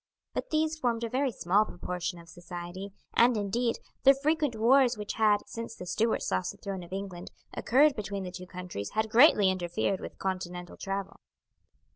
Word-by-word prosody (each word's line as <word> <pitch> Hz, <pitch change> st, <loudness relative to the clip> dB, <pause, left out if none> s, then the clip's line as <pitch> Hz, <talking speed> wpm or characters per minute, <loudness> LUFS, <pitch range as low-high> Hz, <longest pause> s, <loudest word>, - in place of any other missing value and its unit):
But -, -, -3 dB
these 315 Hz, 0 st, 0 dB
formed 235 Hz, -4 st, 0 dB
a 230 Hz, -, -2 dB
very 265 Hz, +2 st, 0 dB
small 200 Hz, 0 st, +2 dB
proportion 180 Hz, -3 st, -4 dB
of 170 Hz, 0 st, -13 dB
society, 175 Hz, +3 st, -8 dB, 0.2 s
and, 235 Hz, 0 st, +5 dB
indeed, 230 Hz, +4 st, 0 dB, 0.2 s
the 275 Hz, +1 st, +7 dB
frequent 295 Hz, -2 st, 0 dB
wars 245 Hz, +2 st, +4 dB
which 210 Hz, -1 st, -4 dB
had, 210 Hz, -2 st, +3 dB
since 230 Hz, +2 st, -7 dB
the 180 Hz, -, -8 dB
Stuarts 225 Hz, +5 st, 0 dB
lost 95 Hz, 0 st, 0 dB
the -, -, -17 dB
throne 195 Hz, -2 st, -5 dB
of 175 Hz, -, -12 dB
England, 190 Hz, -2 st, -6 dB, 0.2 s
occurred 280 Hz, +3 st, +4 dB
between 200 Hz, -2 st, -4 dB
the 180 Hz, -, -5 dB
two 185 Hz, 0 st, -8 dB
countries 180 Hz, -, -6 dB
had 220 Hz, 0 st, +1 dB
greatly 225 Hz, -6 st, +7 dB
interfered 180 Hz, +1 st, -1 dB
with -, -, -8 dB
continental 180 Hz, -2 st, -4 dB
travel. 195 Hz, 0 st, -4 dB
205 Hz, 175 wpm, -29 LUFS, 180-235 Hz, 0.2 s, the